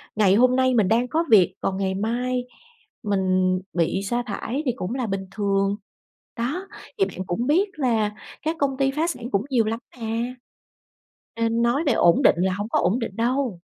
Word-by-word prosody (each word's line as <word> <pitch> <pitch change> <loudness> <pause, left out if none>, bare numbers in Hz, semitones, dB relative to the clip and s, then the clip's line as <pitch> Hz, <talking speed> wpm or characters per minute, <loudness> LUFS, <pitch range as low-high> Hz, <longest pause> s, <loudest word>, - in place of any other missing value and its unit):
Ngày 200 -3 +4
hôm 255 +3 +4
nay 260 0 +3
mình 215 -6 +3
đang 235 +4 +2
có 320 +6 +1
việc, 190 -4 +5
còn 190 - -1
ngày 190 -1 -1
mai 245 +4 -1 0.6
mình 185 -3 +1
bị 175 +2 0
sa 240 +4 -1
thải 240 +6 -3
thì 250 - +2
cũng 210 +1 -4
là 255 -3 -2
bình 195 -1 -3
thường. 195 -1 0 0.6
Đó, 300 +12 -2 0.3
thì 390 - +4
bạn 185 - -6
cũng 230 +8 -2
biết 365 +8 +3
là 225 -6 +1 0.3
các 315 +3 -1
công 275 -2 0
ty 270 0 +2
phá 310 +4 0
sản 245 -8 -4
cũng 200 +3 0
nhiều 240 -4 +2
lắm 225 +1 -2 0.2
mà! 230 +3 -2 1.0
Nên 230 0 0
nói 240 +6 +2
về 275 - +3
ổn 170 -4 +4
định - - +5
là 185 +1 +1
hổng 205 +3 -4
có - - +2
ổn 205 +8 +1
định 225 -4 -4
đâu! 240 -3 0
230 Hz, 195 wpm, -24 LUFS, 195-255 Hz, 1.0 s, việc